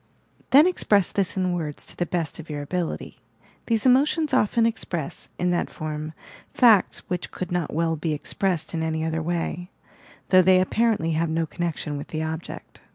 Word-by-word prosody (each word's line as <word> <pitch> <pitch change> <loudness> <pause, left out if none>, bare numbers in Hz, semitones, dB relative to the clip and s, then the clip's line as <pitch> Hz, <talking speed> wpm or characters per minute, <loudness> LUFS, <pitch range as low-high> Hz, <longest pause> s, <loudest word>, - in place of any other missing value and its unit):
Then 285 +4 +7
express 210 - +2
this 195 -1 0
in 185 -1 +1
words 155 -4 -4
to - - -7
the 175 - -2
best 165 -2 -2
of 160 - -10
your 145 -1 -4
ability. 175 +3 -4 0.5
These 225 -1 +1
emotions 290 +4 +3
often 230 -1 +3
express, 175 -9 -3
in 180 0 +1
that 175 - 0
form, 155 0 -5 0.4
facts 225 -7 +4
which 180 -1 -3
could 185 0 -6
not 175 -3 -1
well 165 +1 0
be 160 +1 -2
expressed 170 +3 -2
in 165 - -1
any 160 0 -1
other 160 0 -1
way, 175 +1 -3 0.6
though 185 -1 +7
they 185 0 +5
apparently 210 -3 +1
have 160 +1 0
no 165 +1 0
connection 160 -3 -3
with 145 - -7
the 155 0 -3
object. 160 +1 -7
175 Hz, 175 wpm, -24 LUFS, 160-195 Hz, 0.6 s, Then